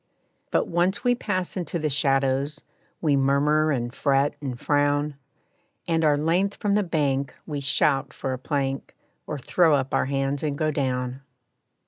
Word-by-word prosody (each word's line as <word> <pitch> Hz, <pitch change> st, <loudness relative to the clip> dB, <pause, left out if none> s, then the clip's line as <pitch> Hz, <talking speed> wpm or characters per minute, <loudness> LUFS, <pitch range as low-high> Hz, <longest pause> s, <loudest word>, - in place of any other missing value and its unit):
But -, -, +1 dB
once 175 Hz, +6 st, +1 dB
we 245 Hz, -1 st, +4 dB
pass 185 Hz, -6 st, -2 dB
into 175 Hz, -2 st, -3 dB
the 155 Hz, -2 st, -1 dB
shadows, 135 Hz, +1 st, +1 dB, 0.4 s
We 150 Hz, -4 st, +3 dB
murmur 145 Hz, +3 st, +3 dB
and 120 Hz, -3 st, -2 dB
fret 140 Hz, 0 st, +2 dB
and 130 Hz, -4 st, -4 dB
frown, 145 Hz, 0 st, +1 dB, 0.7 s
And, 165 Hz, -1 st, +1 dB
our 150 Hz, -2 st, +4 dB
length 175 Hz, +6 st, +1 dB
from 205 Hz, -3 st, 0 dB
the 210 Hz, -, +3 dB
bank, 140 Hz, -7 st, -1 dB
we 145 Hz, -3 st, -4 dB
shout 140 Hz, 0 st, +1 dB
for 135 Hz, -1 st, -4 dB
a 130 Hz, -, -5 dB
plank, 135 Hz, -1 st, -2 dB, 0.3 s
Or 150 Hz, -, -3 dB
throw 160 Hz, +3 st, +3 dB
up 135 Hz, -1 st, -2 dB
our -, -, +2 dB
hands 135 Hz, 0 st, -1 dB
and 145 Hz, -2 st, -2 dB
go 155 Hz, 0 st, +1 dB
down. 130 Hz, -2 st, -2 dB
145 Hz, 160 wpm, -25 LUFS, 135-160 Hz, 0.7 s, we